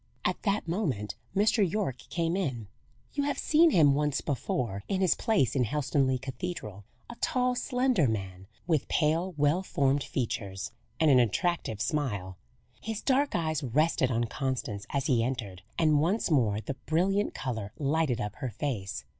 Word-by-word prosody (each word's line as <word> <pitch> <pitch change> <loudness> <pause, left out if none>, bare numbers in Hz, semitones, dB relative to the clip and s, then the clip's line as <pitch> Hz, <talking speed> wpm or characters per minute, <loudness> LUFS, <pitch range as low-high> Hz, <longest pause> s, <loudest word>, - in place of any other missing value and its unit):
At - - 0
that 200 -3 0
moment 150 - -1 0.2
Mr. 210 +4 +3
Yorke 185 - 0
came 170 0 0
in. 130 - -2 0.5
You 285 - 0
have 290 - -1
seen 325 +2 +5
him 155 - +5
once 150 0 +1
before, 120 -7 -2
in 195 - 0
his 185 -2 +4
place 215 - +1
in 130 - +3
Helstonleigh 135 +1 +1
Cathedral: 130 - -6 0.2
a - - -8
tall, 250 -1 +1
slender 250 - +1
man, 95 -4 -4 0.2
with 160 -5 +1
pale, 165 +3 +1
well 150 +5 +3
formed 140 -6 +1
features, 100 -6 -3 0.3
and 155 -2 +5
an 130 - +7
attractive 125 - 0
smile. 105 - -2 0.4
His 225 -1 -4
dark 280 +1 +2
eyes 155 -3 0
rested 140 +1 +2
on 120 -2 +1
Constance 120 -4 -3
as 140 -2 -1
he 120 -5 +3
entered, 115 -8 -4 0.2
and 155 -3 +4
once 185 +4 +1
more 110 -8 +3
the 135 - -4
brilliant 195 +6 +1
colour 110 -7 -4
lighted 145 -3 +1
up 105 0 -4
her 130 -3 -3
face. 115 -6 -4
145 Hz, 160 wpm, -29 LUFS, 115-175 Hz, 0.5 s, an